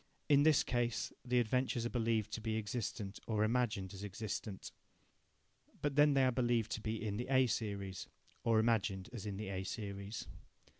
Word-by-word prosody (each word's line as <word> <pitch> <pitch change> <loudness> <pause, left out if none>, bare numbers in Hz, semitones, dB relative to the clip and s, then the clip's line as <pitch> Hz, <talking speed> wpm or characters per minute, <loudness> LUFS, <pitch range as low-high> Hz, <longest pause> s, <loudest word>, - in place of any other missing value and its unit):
In 145 -2 +6
this 155 -1 +5
case, 120 -2 -1
the 125 0 +2
adventures 120 0 +1
are 120 - -2
believed 115 -3 +1
to 110 - -4
be 110 0 -1
existent 105 -2 -3
or 110 -2 +2
imagined 110 -4 0
as 95 +1 -7
existent. 105 0 -5 1.1
But 145 -2 -1
then 145 0 +6
they 135 -1 +5
are 130 - +4
believed 120 -3 +1
to 110 - -2
be 110 0 -2
in 105 -1 -1
the 120 - -3
A 130 -1 +5
series, 100 -5 -3 0.4
or 115 -1 +4
imagined 110 -3 +1
as 110 -3 -5
in 100 -2 -3
the 105 -1 -4
A 95 -1 -2
series. 100 +1 -5
110 Hz, 180 wpm, -36 LUFS, 100-120 Hz, 1.1 s, In